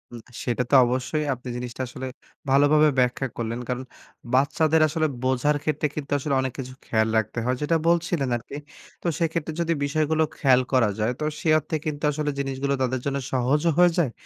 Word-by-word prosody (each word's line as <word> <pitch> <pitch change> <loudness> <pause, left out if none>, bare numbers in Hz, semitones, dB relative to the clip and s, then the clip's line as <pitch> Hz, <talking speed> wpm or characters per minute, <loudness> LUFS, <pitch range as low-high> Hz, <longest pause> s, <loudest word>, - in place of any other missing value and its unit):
উম - - -7 0.2
সেটা 125 0 0
তো - - +6
অবশ্যই 130 +5 -1
আপনি 125 0 -10
জিনিসটা 125 +1 -6
আসলে 130 0 -6 0.4
ভালোভাবে 145 +2 +5
ব্যাখ্যা 125 +2 +1
করলেন। 115 0 -3
কারণ 125 +1 -2 0.5
বাচ্চাদের 155 +4 +3
আসলে 155 +1 0 0.2
বোঝার 130 +3 +2
ক্ষেত্রে 155 0 0
কিন্তু 150 -2 -6
আসলে 140 +1 -2
অনেক 130 -1 -3
কিছু 130 -2 -6
খেয়াল 110 -1 +1
রাখতে 110 +2 -1
হয়। 125 +1 +1
যেটা 165 +3 +2
বলছিলেন 170 -5 +1
আরকি। 120 +4 -10 0.5
তো - - -3
সেক্ষেত্রে 165 -1 -1
যদি 170 0 +1
বিষয়গুলো 155 +2 +1
খেয়াল 130 -4 +4
করা 120 -5 +4
যায়, 110 +3 +1
তো - - -3 0.2
সে 165 - -1
অর্থে 155 - -4
কিন্তু 150 -1 -4
আসলে 150 0 -2
জিনিসগুলো 135 0 -1
তাদের 130 0 0
জন্য 140 0 -1
সহজও 140 +6 +2
হয়ে 180 0 +6
যায়, 160 -8 +2
140 Hz, 180 wpm, -24 LUFS, 125-155 Hz, 0.5 s, তো